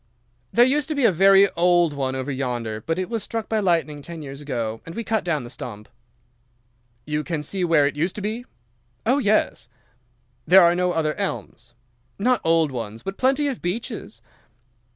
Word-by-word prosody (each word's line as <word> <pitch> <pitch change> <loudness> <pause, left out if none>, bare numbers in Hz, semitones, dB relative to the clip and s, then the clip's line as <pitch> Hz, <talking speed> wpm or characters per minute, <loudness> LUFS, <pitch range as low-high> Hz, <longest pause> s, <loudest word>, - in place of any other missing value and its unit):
"'There 240 - +6
used 280 +2 +1
to 310 - -1
be 280 -3 +2
a 225 - +6
very 195 +3 +6
old 175 -2 +3
one 135 -2 -2
over 130 +2 -3
yonder 120 -5 -3
but 165 +1 0
it 185 -1 -2
was 230 -1 -2
struck 225 0 -4
by 220 - 0
lightning 165 -6 0
ten 165 +1 -8
years 140 0 -8
ago, 115 -6 -3
and 165 - -10
we 230 - -3
cut 220 -2 0
down 155 -6 -1
the 120 - -9
stump.' 105 -4 -8 1.2
"'You 150 0 -2
can 160 -3 -3
see 185 +5 -2
where 165 -4 +4
it 145 - -1
used 170 +5 -1
to 210 - -5
be?' 225 +4 -3 0.6
"'Oh, 255 +5 +3
yes.' 215 -4 +1 0.8
"'There 190 +1 +8
are 170 0 +5
no 180 0 +1
other 155 -2 0
elms?' - - -5 0.4
"'No 245 +4 +2
old 165 -2 +3
ones, 115 -3 -6
but 195 0 -5
plenty 270 +3 +2
of 270 -4 -3
beeches. 210 +2 -4
170 Hz, 190 wpm, -23 LUFS, 145-215 Hz, 1.2 s, There